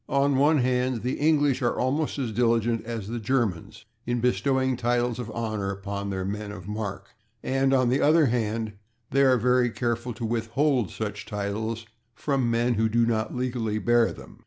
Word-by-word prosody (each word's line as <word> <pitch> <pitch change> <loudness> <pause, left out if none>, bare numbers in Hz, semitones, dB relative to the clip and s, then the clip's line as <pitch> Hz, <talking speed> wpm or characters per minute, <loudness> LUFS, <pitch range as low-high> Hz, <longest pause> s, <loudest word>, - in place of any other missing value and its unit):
On 140 +1 +2
the 130 - +2
one 150 +3 +4
hand 125 -2 0
the 125 - -2
English 145 -3 +3
are 120 - 0
almost 145 +5 0
as 130 -5 -2
diligent 115 0 +1
as 115 -4 -5
the 120 +2 -4
Germans 110 -7 -2 0.2
in 120 0 0
bestowing 130 +2 +1
titles 120 0 0
of 120 -2 -5
honor 110 -3 -3
upon 100 +1 -4
their 95 -1 -3
men 105 +1 -4
of 95 -2 -9
mark, 105 -1 -5 0.3
and 135 0 +1
on 130 -2 +3
the 130 +3 +2
other 155 +1 +5
hand 110 -3 -1 0.4
they 135 - +3
are 130 -2 +5
very 125 +1 +3
careful 120 +1 -2
to 115 - -4
withhold 120 - 0
such - - -5
titles 110 +2 -3 0.3
from 135 0 0
men 120 +1 +2
who 110 0 +1
do 115 +1 +3
not 110 0 -1
legally 120 -4 -1
bear 120 +2 +3
them. - - -12
120 Hz, 180 wpm, -26 LUFS, 110-130 Hz, 0.4 s, other